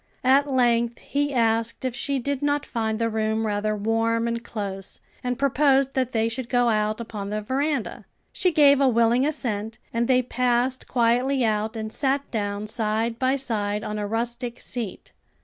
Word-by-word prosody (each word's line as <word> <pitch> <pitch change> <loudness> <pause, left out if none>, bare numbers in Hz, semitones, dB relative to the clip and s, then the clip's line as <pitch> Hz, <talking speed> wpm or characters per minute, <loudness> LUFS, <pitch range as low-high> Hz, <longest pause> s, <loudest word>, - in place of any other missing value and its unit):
At 275 +2 +4
length 235 -2 +2
he 290 +1 -2
asked 230 -1 +1
if 255 - -1
she 275 +1 -1
did 275 +1 -2
not 290 0 0
find 220 -2 -2
the 230 0 0
room 220 0 0
rather 215 0 0
warm 225 +2 +1
and 235 0 -2
close, 195 -4 -5 0.2
and 250 -1 -1
proposed 275 0 +3
that 255 -2 0
they 225 -1 +1
should 235 +1 -4
go 245 -1 +3
out 215 0 0
upon 210 -4 -5
the 210 +1 -2
veranda. 270 +3 -2 0.3
She 365 - +2
gave 285 -3 +5
a 275 - +5
willing 235 +3 +3
assent 225 -7 -3 0.2
and 230 0 +1
they 255 -1 +3
passed 250 +1 0
quietly 245 +2 +2
out 215 +1 0
and 220 0 -5
sat 275 0 0
down 205 -2 -2
side 225 +1 -1
by 260 +1 +2
side 210 -6 -1
on 210 0 -4
a 205 - -2
rustic 235 +2 -3
seat. 230 -6 -5
235 Hz, 175 wpm, -24 LUFS, 220-260 Hz, 0.3 s, gave